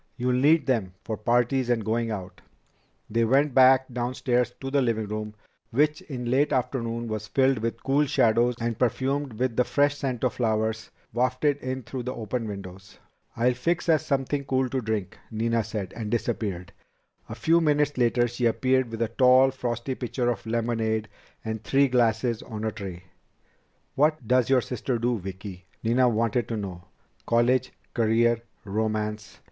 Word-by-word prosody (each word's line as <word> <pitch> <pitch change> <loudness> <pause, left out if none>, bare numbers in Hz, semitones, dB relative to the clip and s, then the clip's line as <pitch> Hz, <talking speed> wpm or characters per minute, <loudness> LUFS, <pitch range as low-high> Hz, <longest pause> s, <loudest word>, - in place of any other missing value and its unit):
"You'll 125 0 0
need 145 +4 +4
them 110 -9 -1
for 110 - -3
parties 120 +3 +1
and 115 -3 +1
going 115 +1 0
out." 95 -4 -6 0.7
They 115 +2 +1
went 135 +4 +3
back 130 0 +6
downstairs 125 0 0
to 135 0 -5
the 140 0 +3
living 115 -3 0
room, 105 0 -5 0.3
which 150 +5 +1
in 125 -4 -5
late 140 +3 +2
afternoon 120 -2 -1
was 110 -1 -4
filled 135 -2 +2
with 115 +1 -3
cool 140 +2 +2
shadows 120 -3 +3
and 115 -1 -2
perfumed 135 +2 0
with 120 +1 -1
the 125 - +5
fresh 145 +3 +2
scent 130 -4 -3
of 130 - +1
flowers 110 -1 -1 0.2
wafted 130 +4 +1
in 130 -1 -4
through 130 +1 -5
the 125 +1 -4
open 115 +1 -3
windows. 95 -2 -9 0.4
"I'll 125 +2 +3
fix 165 +9 -1
us 155 -2 +4
something 140 -1 -1
cool 130 -1 0
to 130 +1 -1
drink," 110 -4 -3
Nina 115 +1 0
said, 105 -2 -5
and 110 -2 -4
disappeared. 105 -6 -2 0.6
A 110 - -5
few 165 +9 +3
minutes 150 -2 +2
later 120 0 +2
she 120 +1 -2
reappeared 130 +2 +2
with 115 0 -2
a - - 0
tall, 130 +2 +5
frosty 125 0 -3
pitcher 125 -1 -1
of 115 -1 -6
lemonade 110 -1 -1 0.4
and 110 0 -4
three 140 +1 +3
glasses 115 -2 +1
on 110 -2 -7
a 110 - 0
tray. 95 -5 -7 0.9
"What 150 -3 +1
does 125 0 +3
your 130 -2 +4
sister 125 +1 -3
do, 120 0 0
Vicki?" 95 0 -8 0.2
Nina 125 +2 +3
wanted 115 +1 0
to 115 - -3
know. 90 -4 -6 0.4
"College? 120 +2 +2 0.2
Career? 115 0 +2 0.2
Romance?" 105 0 -3
120 Hz, 165 wpm, -26 LUFS, 110-130 Hz, 0.9 s, back